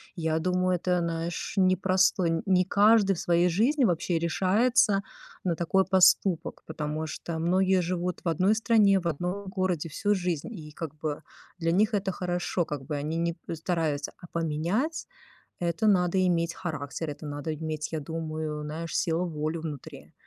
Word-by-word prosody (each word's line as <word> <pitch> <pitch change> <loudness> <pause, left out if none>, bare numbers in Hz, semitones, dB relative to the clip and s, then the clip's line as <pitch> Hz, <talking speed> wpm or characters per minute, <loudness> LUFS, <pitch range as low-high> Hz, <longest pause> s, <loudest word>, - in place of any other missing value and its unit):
я 160 -2 0
думаю, 185 +1 +1
это, 180 0 0
знаешь, 165 0 -3
непростой 185 -1 +3
не 185 -2 +3
каждый 205 0 +4
в - - -6
своей 175 +1 +3
жизни 240 - +2
вообще 175 -2 0
решается 200 +5 +2 0.4
на 170 -2 +1
такой 190 +3 +2
поступок, 185 -2 +3
потому 155 0 -3
что 160 +2 -5
многие 185 +2 +3
живут 180 +1 -2
в - - -1
одной 185 +6 +3
стране, 215 -4 +4
в 170 - -3
одном 180 +5 -3
городе 185 -4 -1
всю 205 +7 0
жизнь, 180 +3 -2
и, 155 -5 -9
как 160 -2 -6
бы, 150 -1 -4 0.4
для 165 0 +1
них 210 +4 +2
это 195 -1 0
хорошо, 175 -1 -1
как 145 -3 -5
бы 150 +1 -3
они 150 +3 -3
не 170 0 -1 0.2
стараются 160 -3 -1
а 175 - -12
поменять- 170 - -1 0.5
это 170 +4 0
надо 185 -2 +3
иметь 170 -1 +1
характер, 155 -3 -5
это 150 +1 -8
надо 145 +2 -4
иметь, 155 0 -4
я 160 - -2
думаю, 155 -1 -4
знаешь, 160 +2 -5
силу 170 -1 +1
волю 155 0 -3
внутри. 150 -5 -8
170 Hz, 160 wpm, -27 LUFS, 160-190 Hz, 0.5 s, каждый